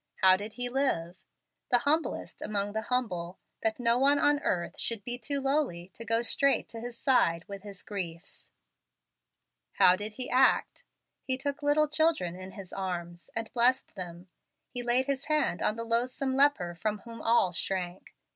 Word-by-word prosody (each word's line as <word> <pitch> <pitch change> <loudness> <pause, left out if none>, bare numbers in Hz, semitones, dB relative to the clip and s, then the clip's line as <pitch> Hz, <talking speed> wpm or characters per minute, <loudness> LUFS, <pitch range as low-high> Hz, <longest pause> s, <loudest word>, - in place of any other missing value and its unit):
How 185 0 +8
did 205 +3 -6
He 245 0 -1
live? 240 -10 -1 0.5
The 245 - +5
humblest 295 +6 0
among 205 -1 -2
the 220 - -1
humble, 185 -9 -2 0.2
that 220 +1 0
no 235 0 +2
one 280 +2 +4
on 290 0 +3
earth 175 - -2
should 230 -3 -2
be 245 +2 -3
too 280 +4 -2
lowly 270 - -1
to 230 - -8
go 230 +1 +1
straight 275 +3 +2
to 230 - -8
His 240 0 -7
side 170 -12 +2
with 200 -1 -8
his 200 -1 -9
griefs. 175 -5 -6 1.2
How 180 - +6
did 210 +2 -5
He 250 +2 -3
act? 260 +1 +2 0.4
He 260 -1 -1
took 285 +3 -3
little 295 +1 +3
children 305 - +1
in 185 +1 -9
His 195 -3 -10
arms, 175 -2 -5
and 225 0 -4
blessed 250 +2 +3
them. 175 0 -8 0.4
He 245 - -2
laid 245 +2 +2
His 275 0 -2
hand 305 - +1
on 210 - +1
the 230 - -2
loathsome 255 +3 0
leper 270 -11 +3
from 210 +5 -2
whom 230 -1 -9
all 230 -5 +3
shrank. 180 +1 -4
230 Hz, 175 wpm, -29 LUFS, 185-265 Hz, 1.2 s, How